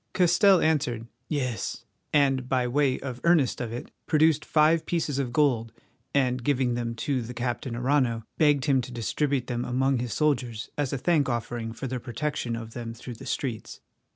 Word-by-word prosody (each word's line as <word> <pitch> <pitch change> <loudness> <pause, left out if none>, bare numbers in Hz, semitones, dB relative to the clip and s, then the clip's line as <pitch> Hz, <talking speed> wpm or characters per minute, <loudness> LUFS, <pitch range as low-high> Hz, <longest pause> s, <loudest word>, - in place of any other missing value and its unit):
Castell 180 +1 +5
answered, 130 -8 +1 0.2
"Yes," 125 -6 -2 0.3
and, 135 -3 +2
by 125 -2 +1
way 135 +1 +1
of 130 -2 -6
earnest 165 -8 +3
of 120 -2 -4
it, 120 - -6 0.2
produced 155 -1 +3
five 155 +1 +3
pieces 155 -5 -1
of 130 -3 -1
gold, 120 -5 +2 0.4
and 125 -3 +1
giving 130 -2 +1
them 120 -1 -2
to 130 +2 -1
the 120 +2 -7
Captain 120 0 -3
Arrano, 125 -2 +1 0.2
begged 145 -3 +4
him 135 -3 +3
to 125 - -8
distribute 125 - -1
them 120 -1 -2
among 130 +1 +1
his 120 -1 -3
soldiers 125 -6 0
as 145 -3 -1
a 140 - -1
thankoffering 120 -7 0
for 115 - -7
their 130 -1 -3
protection 125 0 -3
of 115 -1 -7
them 115 -1 -6
through 120 +2 -8
the 110 - -10
streets. 120 -5 -4
130 Hz, 175 wpm, -27 LUFS, 120-145 Hz, 0.4 s, Castell